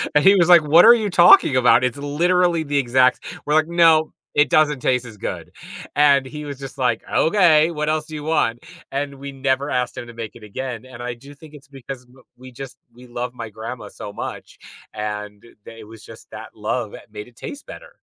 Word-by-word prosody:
And 150 - +4
he 195 +1 +7
was 175 -2 +2
like, 175 -2 +8
"What 155 +4 +6
are - - +9
you 215 -3 -2
talking 175 -6 +6
about? 120 -1 +4
It's 125 +2 -1
literally 170 +4 +1
the 145 -1 -2
exact" 130 -1 +2 0.2
we're 150 - -1
like, 155 0 +3
"No, 165 -2 +3 0.2
it 150 +1 +3
doesn't 150 -3 +2
taste 125 -1 0
as 115 -3 -11
good." - - -6 0.4
And 140 -2 +4
he 150 +3 -8
was 140 -2 -8
just 135 -1 -9
like, 125 -4 0
"Okay, 165 -3 +3
what 150 -1 -3
else 155 0 -1
do 155 - -9
you 150 - -7
want?" 150 -7 -1 0.3
And 140 0 -4
we 140 +1 -9
never 135 +1 -1
asked 125 -2 -2
him 120 - -7
to 120 - -11
make 115 -2 -8
it 115 - -14
again, 120 +3 -7
and 125 -2 -12
I 125 0 -4
do 140 +4 -15
think 155 +1 -16
it's 140 - -16
because 135 -1 -9
w 125 +1 -22
we 130 +1 -13
just 135 +1 -10 0.2
we 125 +1 -15
love 120 +1 -5
my 115 -2 -8
grandma 110 +1 -8
so 105 - -9
much, - - -8 0.4
and 105 -1 -6 0.2
tha 115 -1 -12
was 110 0 -14
just - - -14
that - - -11
love - - -3
that - - -13
made 105 +2 -8
it 120 - -27
taste 285 - -9
better. - - -12
135 Hz, 220 wpm, -20 LUFS, 120-155 Hz, 0.4 s, are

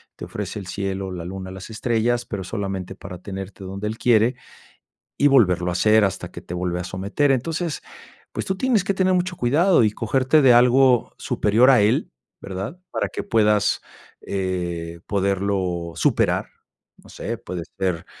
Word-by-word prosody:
te - - -10
ofrece - - -5
el 95 - -9
cielo, 95 0 -3
la 85 -2 -6
luna, 95 +1 -6
las 95 +2 -9
estrellas, 120 +1 0
pero 95 -3 -5
solamente 95 -2 -4
para 90 -1 -9
tenerte 95 +1 -7
donde 100 +3 -4
él 110 +1 -4
quiere 120 +1 +3 0.8
y 145 - +5
volverlo 90 -10 +4
a - - -2
hacer 105 +3 +4
hasta 95 -2 -4
que - - -8
te 90 - -8
vuelve 90 0 -2
a 90 - -3
someter. 100 +10 0
Entonces, 160 +5 -1 0.5
pues - - -4
tú 190 - -1
tienes 220 -3 +1
que 200 - +1
tener 185 -1 +2
mucho 180 0 0
cuidado 150 +4 +4
y 105 - +3
cogerte 130 +7 +2
de 130 -3 +7
algo 125 +1 +4
superior 110 +5 +3
a 130 -5 +6
él, 105 +1 +1 0.3
¿verdad? 100 - -6
Para - - -1
que - - -5
puedas, 105 -2 +2 0.4
eh, 85 -3 -3
poderlo 95 -3 -1
superar. - - +1 0.5
No - - -18
sé, 115 +3 -5
puede 90 -2 -6
ser 90 -4 -1
100 Hz, 170 wpm, -22 LUFS, 95-125 Hz, 0.8 s, de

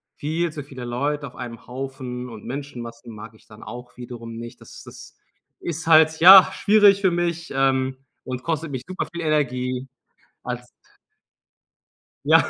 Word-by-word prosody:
viel 160 +3 -2
zu 150 -2 -7
viele 135 -3 -10
Leute 140 +5 -2
auf 125 - -14
einem 120 -2 -8
Haufen 125 -1 -6
und 110 -3 -10
Menschenmassen 120 -4 -7
mag 110 +1 -10
ich - - -23
dann 105 0 -14
auch 125 +2 -10
wiederum 120 -2 -8
nicht. 115 0 -9
Das - - -13
das - - -13 0.4
ist 165 -1 -5
halt, 160 0 +6
ja, 190 +3 +10
schwierig 205 -2 +5
für 190 - +3
mich, 170 -1 -2
ähm, 130 -1 +1 0.3
und 125 0 -5
kostet 165 -2 -2
mich 130 -3 -5
super 185 - -4
viel 170 - -4
Energie 130 -4 -1 0.6
als - - -5 1.6
Ja. - - +6
135 Hz, 155 wpm, -23 LUFS, 125-160 Hz, 1.6 s, ja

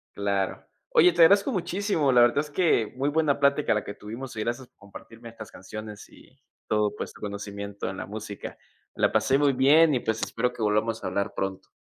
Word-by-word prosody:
Claro. 100 -1 -2 0.2
Oye, 175 +1 +5
te 170 - +2
agradezco 200 +9 +6
muchísimo. 185 - 0
La 120 -1 +5
verdad 120 +4 +4
es 150 0 -3
que 145 - +2
muy 140 +3 0
buena 150 -2 +1
plática 140 -1 +2
la 105 - -1
que 100 - -7
tuvimos 115 +4 -8
y - - -5
gracias 120 +3 -3
por - - -49
compartirme 115 +3 -13
estas 110 -2 -11
canciones 105 +2 -9
y - - -20 0.3
todo, 105 -1 0
pues, - - -6
tu - - -17
conocimiento 100 -1 -6
en 95 - -7
la - - -5
música. 105 0 -8 0.4
La - - +2
pasé 110 +5 +2
muy 145 -1 +3
bien 145 +4 +5
y, 125 - +1
pues, 110 -1 -2
espero 125 +2 -1
que 120 - -10
volvamos 110 +2 0
a - - -2
hablar 100 0 -2
pronto. 95 0 -4
115 Hz, 210 wpm, -26 LUFS, 105-145 Hz, 0.4 s, agradezco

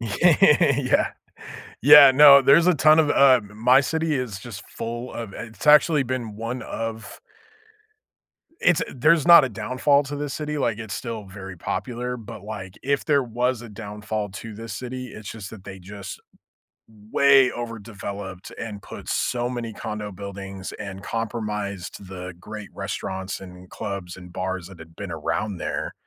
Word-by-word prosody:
Yeah. 140 - +3 0.7
Yeah. 145 0 +10
No. 140 0 +8
There's 145 +6 +5
a 180 - +5
ton 155 +1 +5
of, 150 -2 +3
uh 130 -3 +6
my 125 +5 +4
city 160 +2 -1
is 125 -7 -3
just 105 -1 -10
full 120 +2 -6
of 115 -4 -6
it's 115 - -9
actually 150 0 +6
been 120 -5 -4
one 115 +2 -4
of 115 0 -6 1.4
it's 180 -4 +3
there's 150 +5 +3
not 170 -4 +9
a 130 - -2
downfall 130 +7 +1
to 145 +1 -6
this 145 -1 -4
city. 150 -1 -3
Like, 115 -5 0
it's 110 -3 -6
still 115 -2 -5
very 95 -1 -9
popular. 125 +7 -4
But, 110 -4 -10
like, 100 -3 -8
if 140 +1 0
there 145 -3 +3
was 120 +1 -1
a 120 - -10
downfall 105 0 -5
to 110 +3 -8
this 115 -1 -8
city, 130 +1 -6
it's 105 -3 -9
just 105 -3 -8
that 110 -4 -12
they 95 -1 -9
just 100 +1 -9 0.9
way 135 -2 +5
overdeveloped 100 -4 -7
and 105 -3 -6
put - - -10
so 120 0 -1
many 120 -2 -4
condo 105 -1 -6
buildings 95 0 -8
and 95 -2 -8
compromised 105 -5 -4
the 90 -1 -7
great 105 +2 -9
restaurants 95 0 -5
and 90 -1 -12
clubs 95 -3 -6
and 90 -1 -12
bars 95 -1 -4
that 95 -3 -14
had 80 0 -14
been 100 -4 -7
around 80 +6 -3
there - - -4
115 Hz, 160 wpm, -23 LUFS, 100-130 Hz, 1.4 s, Yeah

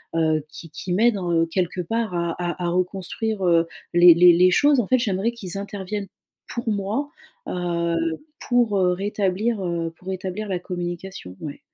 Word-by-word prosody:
heu, 155 -2 +2
qu'ils 165 +2 -10
qu'ils 175 +3 -3
m'aident 225 +2 +3
en 170 -2 +1
quelque 180 +1 -2
part 225 +3 -2
à 170 -1 -1 0.3
à 175 - 0
reconstruire, 190 +3 -2
heu, 170 -1 +4 0.3
les 175 0 +9
les 175 +1 +8
les 180 +2 +5
choses, 285 +7 +4
en 225 - 0
fait. 255 -1 +3
J'aimerais 210 -1 0
qu'ils 195 -5 -5
interviennent, 200 0 -5 0.4
pour 235 -1 -4
moi, 210 +8 -1 0.4
heu, 170 -1 -1 0.5
pour 245 -3 +3
rétablir, 195 +3 0
heu, 170 -1 -2
pour 185 - -17
rétablir 190 +3 -4
la 180 -2 -1
communication, 175 - -6
ouais. 145 -2 -7
185 Hz, 160 wpm, -23 LUFS, 175-210 Hz, 0.5 s, les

